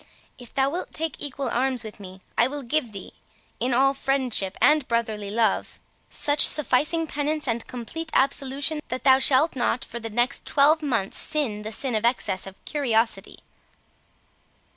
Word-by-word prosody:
If 245 Hz, -2 st, -12 dB
thou 270 Hz, +1 st, +1 dB
wilt 350 Hz, +4 st, -5 dB
take 320 Hz, 0 st, -3 dB
equal 280 Hz, -2 st, -4 dB
arms 255 Hz, 0 st, -1 dB
with 215 Hz, -1 st, -10 dB
me, 190 Hz, -1 st, -11 dB
I 235 Hz, -, +4 dB
will 285 Hz, +1 st, -6 dB
give 250 Hz, -1 st, -1 dB
thee, 195 Hz, -3 st, -9 dB, 0.5 s
in 250 Hz, +3 st, 0 dB
all 270 Hz, +3 st, +3 dB
friendship 260 Hz, -8 st, -1 dB
and 300 Hz, -2 st, +4 dB
brotherly 220 Hz, -4 st, -2 dB
love, 220 Hz, -1 st, 0 dB, 0.3 s
such 290 Hz, 0 st, +1 dB
sufficing 305 Hz, +3 st, +1 dB
penance 300 Hz, 0 st, -2 dB
and 230 Hz, -1 st, -2 dB
complete 315 Hz, +7 st, -6 dB
absolution, 275 Hz, +2 st, +1 dB
that 255 Hz, -, -5 dB
thou 265 Hz, -1 st, +6 dB
shalt 275 Hz, +4 st, +3 dB
not 245 Hz, -1 st, -1 dB
for 235 Hz, -, -6 dB
the 225 Hz, 0 st, -5 dB
next 240 Hz, +5 st, -1 dB
twelve 300 Hz, +3 st, +4 dB
months 230 Hz, -10 st, -1 dB
sin 250 Hz, -9 st, 0 dB
the 215 Hz, +1 st, -6 dB
sin 255 Hz, +2 st, -2 dB
of 215 Hz, 0 st, -1 dB
excess 230 Hz, -6 st, 0 dB
of 195 Hz, -, -13 dB
curiosity." 235 Hz, -6 st, -1 dB
260 Hz, 165 wpm, -24 LUFS, 230-290 Hz, 0.5 s, thou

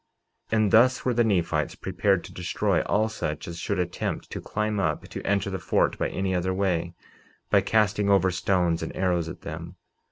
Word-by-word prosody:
49:19 110 Hz, -, +3 dB
And 110 Hz, -2 st, +2 dB
thus 125 Hz, +3 st, +5 dB
were 125 Hz, -, +2 dB
the 120 Hz, 0 st, +3 dB
Nephites 85 Hz, -8 st, 0 dB
prepared 95 Hz, -3 st, 0 dB
to -, -, -11 dB
destroy 90 Hz, -, 0 dB
all 110 Hz, +2 st, +2 dB
such 75 Hz, -9 st, -4 dB
as 85 Hz, -1 st, -6 dB
should -, -, -2 dB
attempt 90 Hz, -1 st, -3 dB
to -, -, -5 dB
climb 105 Hz, -1 st, -2 dB
up 95 Hz, -, -1 dB
to -, -, -6 dB
enter 100 Hz, -1 st, 0 dB
the 95 Hz, -, -3 dB
fort -, -, +1 dB
by -, -, 0 dB
any 95 Hz, -1 st, -2 dB
other 95 Hz, +1 st, 0 dB
way, 90 Hz, -3 st, -1 dB, 0.6 s
by -, -, +5 dB
casting 105 Hz, -2 st, +2 dB
over 95 Hz, -2 st, +4 dB
stones 90 Hz, -2 st, +1 dB
and 80 Hz, -, -5 dB
arrows 90 Hz, -3 st, 0 dB
at 90 Hz, -, -9 dB
them. 85 Hz, +2 st, -7 dB
95 Hz, 195 wpm, -26 LUFS, 85-105 Hz, 0.6 s, thus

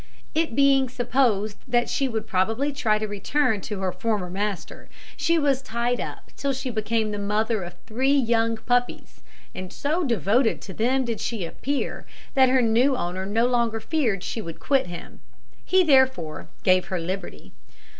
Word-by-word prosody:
It 320 Hz, -6 st, 0 dB
being 275 Hz, -2 st, +4 dB
supposed 240 Hz, -5 st, +1 dB
that 240 Hz, -1 st, +2 dB
she 275 Hz, -, 0 dB
would 225 Hz, -3 st, -3 dB
probably 225 Hz, +10 st, 0 dB
try 220 Hz, -6 st, +1 dB
to 215 Hz, 0 st, -2 dB
return 220 Hz, +2 st, 0 dB
to 205 Hz, -1 st, -5 dB
her 185 Hz, -1 st, 0 dB
former 185 Hz, -1 st, -2 dB
master, 195 Hz, -2 st, -4 dB, 0.3 s
she 335 Hz, 0 st, +2 dB
was 280 Hz, -4 st, +2 dB
tied 240 Hz, 0 st, -1 dB
up -, -, -7 dB
till 280 Hz, -1 st, -1 dB
she 260 Hz, 0 st, -4 dB
became 220 Hz, 0 st, 0 dB
the 205 Hz, -, -3 dB
mother 210 Hz, +2 st, 0 dB
of 175 Hz, 0 st, -7 dB
three 260 Hz, +5 st, +1 dB
young 230 Hz, -3 st, +2 dB
puppies; 245 Hz, +2 st, -1 dB, 0.3 s
and 185 Hz, 0 st, -7 dB
so 310 Hz, -, -1 dB
devoted 230 Hz, -, +2 dB
to 190 Hz, -, -8 dB
them 255 Hz, +6 st, +1 dB
did 230 Hz, -2 st, -3 dB
she 220 Hz, -7 st, -3 dB
appear, 275 Hz, +11 st, -3 dB, 0.3 s
that 265 Hz, -2 st, +5 dB
her 255 Hz, -1 st, +4 dB
new 240 Hz, +5 st, +3 dB
owner 185 Hz, 0 st, -3 dB
no 225 Hz, +4 st, +2 dB
longer 235 Hz, -2 st, +1 dB
feared 225 Hz, -, 0 dB
she 225 Hz, -, -3 dB
would 165 Hz, -5 st, -8 dB
quit 270 Hz, -8 st, +1 dB
him. 175 Hz, 0 st, -9 dB, 0.4 s
He 375 Hz, 0 st, +4 dB
therefore 260 Hz, -, +2 dB
gave 185 Hz, -1 st, +4 dB
her 185 Hz, -, -4 dB
her -, -, -1 dB
liberty. 185 Hz, +1 st, -6 dB
230 Hz, 175 wpm, -25 LUFS, 205-265 Hz, 0.4 s, that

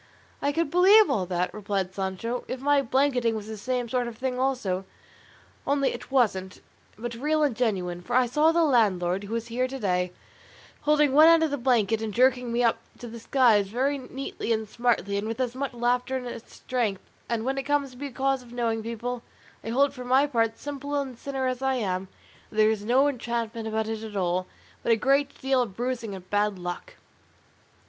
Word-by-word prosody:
"I 285 Hz, -, +1 dB
could 325 Hz, -1 st, -1 dB
believe 390 Hz, +5 st, +6 dB
all 185 Hz, -4 st, 0 dB
that," 180 Hz, 0 st, -1 dB
replied 195 Hz, -3 st, -2 dB
Sancho, 195 Hz, +6 st, -3 dB
"if 255 Hz, -, -4 dB
my 285 Hz, +1 st, +3 dB
blanketing 255 Hz, -3 st, +1 dB
was 215 Hz, -2 st, -5 dB
the 220 Hz, 0 st, -6 dB
same 245 Hz, +3 st, -2 dB
sort 245 Hz, 0 st, -1 dB
of 230 Hz, -2 st, -8 dB
thing 255 Hz, 0 st, -2 dB
also; 245 Hz, -9 st, 0 dB, 0.8 s
only 280 Hz, -1 st, +2 dB
it -, -, -9 dB
wasn't, 195 Hz, -8 st, +1 dB, 0.4 s
but 235 Hz, +2 st, -5 dB
real 300 Hz, +6 st, 0 dB
and 280 Hz, -6 st, +1 dB
genuine; 185 Hz, -7 st, -1 dB
for 240 Hz, +7 st, -3 dB
I 255 Hz, 0 st, +5 dB
saw 300 Hz, +7 st, +3 dB
the 335 Hz, 0 st, +3 dB
landlord, 200 Hz, -, +2 dB
who 220 Hz, +3 st, -4 dB
is 230 Hz, 0 st, -4 dB
here 250 Hz, +2 st, 0 dB
to 270 Hz, +1 st, -6 dB
day, 180 Hz, -5 st, 0 dB, 0.7 s
holding 295 Hz, -2 st, +3 dB
one 310 Hz, +3 st, +8 dB
end 330 Hz, -1 st, +6 dB
of 315 Hz, -, 0 dB
the 285 Hz, -, -1 dB
blanket 225 Hz, -4 st, +2 dB
and 220 Hz, -1 st, -3 dB
jerking 250 Hz, -1 st, +3 dB
me 240 Hz, +1 st, +1 dB
up 230 Hz, -, +2 dB, 0.2 s
to 240 Hz, -, -8 dB
the 230 Hz, 0 st, -8 dB
skies 225 Hz, -4 st, +3 dB
very 265 Hz, +7 st, 0 dB
neatly 260 Hz, -2 st, -5 dB
and 220 Hz, -1 st, 0 dB
smartly, 230 Hz, -3 st, 0 dB
and 210 Hz, -, -4 dB
with 225 Hz, +2 st, -4 dB
as 250 Hz, -2 st, -1 dB
much 275 Hz, +1 st, -3 dB
laughter 245 Hz, +2 st, 0 dB
as 235 Hz, -1 st, -6 dB
strength; 230 Hz, -7 st, -3 dB, 0.3 s
and 230 Hz, -1 st, -1 dB
when 270 Hz, +1 st, -1 dB
it 270 Hz, -, -6 dB
comes 285 Hz, -2 st, +1 dB
to 250 Hz, -, -15 dB
be 285 Hz, +2 st, -5 dB
a -, -, -10 dB
case 270 Hz, 0 st, 0 dB
of 240 Hz, -1 st, -15 dB
knowing 230 Hz, -2 st, -1 dB
people, 235 Hz, +2 st, -4 dB, 0.4 s
I -, -, -5 dB
hold 275 Hz, +4 st, +2 dB
for 250 Hz, -2 st, -8 dB
my 260 Hz, +3 st, +4 dB
part, 225 Hz, -5 st, 0 dB
simple 285 Hz, 0 st, -5 dB
and 265 Hz, -3 st, -4 dB
sinner 265 Hz, +2 st, -4 dB
as 255 Hz, 0 st, -2 dB
I 265 Hz, 0 st, +1 dB
am, 190 Hz, -5 st, -2 dB, 0.4 s
that -, -, -15 dB
there 215 Hz, 0 st, +5 dB
is 210 Hz, -2 st, -3 dB
no 255 Hz, +6 st, +4 dB
enchantment 235 Hz, -4 st, -3 dB
about 220 Hz, 0 st, -1 dB
it 220 Hz, -1 st, -3 dB
at 220 Hz, -2 st, -8 dB
all, 185 Hz, 0 st, 0 dB, 0.3 s
but -, -, 0 dB
a -, -, +6 dB
great 275 Hz, +5 st, +1 dB
deal 265 Hz, -1 st, +2 dB
of 215 Hz, -6 st, -4 dB
bruising 235 Hz, -3 st, -3 dB
and 185 Hz, -1 st, -11 dB
bad 205 Hz, 0 st, +1 dB
luck." 180 Hz, -, -6 dB
240 Hz, 210 wpm, -26 LUFS, 215-270 Hz, 0.8 s, one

